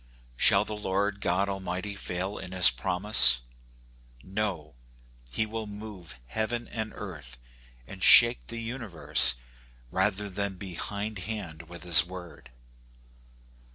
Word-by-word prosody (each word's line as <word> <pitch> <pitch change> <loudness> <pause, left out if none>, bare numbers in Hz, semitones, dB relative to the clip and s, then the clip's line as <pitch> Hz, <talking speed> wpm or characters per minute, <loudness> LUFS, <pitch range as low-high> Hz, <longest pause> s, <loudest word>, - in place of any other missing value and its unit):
Shall 100 +10 +3
the 105 - -6
Lord 100 0 -3
God 95 +3 -1
Almighty 95 +1 -5
fail 95 +1 -6
in 90 - -9
his 90 -6 +7
promise? 90 - +3 0.8
No, 95 - -5 0.6
he - - -2
will 110 0 -7
move 105 -6 -11
heaven 110 - -4
and 110 -1 -6
earth, 75 -11 -10 0.5
and 95 +7 -12
shake 120 0 +6
the 115 - -8
universe, 115 - +3 0.6
rather 105 +2 -1
than 100 0 -5
be 95 -1 -9
behindhand 100 -5 -7
with 85 -1 -11
his 85 -1 +7
word. 90 -7 -12
95 Hz, 120 wpm, -26 LUFS, 90-105 Hz, 0.8 s, his